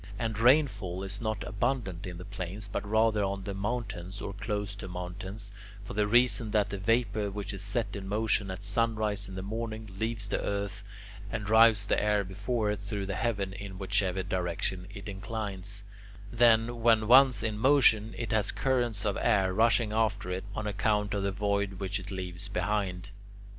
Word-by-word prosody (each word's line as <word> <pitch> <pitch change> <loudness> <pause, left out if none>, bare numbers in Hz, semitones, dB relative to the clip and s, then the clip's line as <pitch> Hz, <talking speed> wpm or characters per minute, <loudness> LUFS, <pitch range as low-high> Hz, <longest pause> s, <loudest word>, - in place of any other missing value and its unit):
And 110 -1 -2
rainfall 110 - +3
is 100 +2 -3
not 110 -2 -2
abundant 100 -3 -2
in 90 -1 -6
the 90 - -8
plains, 100 +1 -5
but 100 - -3
rather 110 0 +2
on 100 0 -2
the 100 - -4
mountains 100 -3 -4
or 100 - -5
close 105 0 -3
to 105 - -7
mountains, 95 +3 -6 0.3
for - - -7
the 105 0 +1
reason 120 0 +4
that 105 -1 +1
the 100 - -4
vapour 110 0 +1
which 100 0 -5
is 95 - -6
set 105 +1 -2
in 100 -1 -6
motion 105 0 +1
at 95 +1 -6
sunrise 105 -1 0
in 95 - -8
the 95 - -5
morning, 110 +1 -4
leaves 110 -1 -1
the - - -1
earth, 100 -1 -3 0.5
and 110 -2 -3
drives 110 -1 +6
the - - +1
air 105 -1 +2
before 105 +3 -1
it 105 - -3
through 100 0 -4
the 100 - -3
heaven 100 -4 -1
in 95 -1 -7
whatever 95 -1 0
direction 90 0 -2
it 100 -1 -9
inclines; 100 -1 -5 0.5
then, 115 0 +4
when 110 -2 +4
once 125 -2 +6
in 110 -2 -2
motion, 115 -5 +4
it 115 -3 -3
has 110 -1 +2
currents 120 -6 0
of 100 -2 0
air 95 -1 +3
rushing 115 +1 +3
after 105 -4 0
it, 95 +2 -3
on 110 - -3
account 105 0 0
of 100 - -1
the 100 0 0
void 100 0 0
which 95 +1 -3
it 95 +1 -8
leaves 95 0 -4
behind. 95 0 -2
105 Hz, 185 wpm, -29 LUFS, 95-110 Hz, 0.5 s, drives